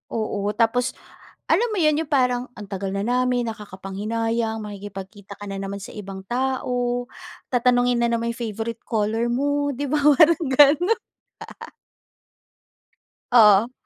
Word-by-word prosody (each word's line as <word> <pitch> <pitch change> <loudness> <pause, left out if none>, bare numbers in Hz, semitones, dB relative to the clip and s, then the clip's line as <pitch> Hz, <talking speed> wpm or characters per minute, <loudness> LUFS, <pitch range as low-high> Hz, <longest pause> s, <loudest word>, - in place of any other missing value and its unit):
Oo, 210 -2 -2
tapos 240 +2 +1 0.6
alam 475 - +3
mo - - -3
yun, 305 0 +3
yung 320 - -3
parang 250 -3 +1
ang 210 - -8
tagal 195 0 -4
na 195 - -1
namin 250 +1 +1
nakakapanghinayang, 220 +2 -3
makikipagkita 200 0 -9
ka 205 - -10
na 195 - -5
naman 195 0 -5
sa - - -9
ibang 195 -2 -8
tao, 245 0 -1 0.5
tatanungin 245 0 +2
na 235 - +2
naman 235 0 -1
yung 235 - -10
favorite 225 0 -4
color 225 +1 0
mo 285 +4 0
‘di 280 - -4
ba 295 +2 0
parang 300 +3 +5
ganun. 295 - +5 2.4
Oo. 220 -1 +6
235 Hz, 135 wpm, -23 LUFS, 210-255 Hz, 2.4 s, Oo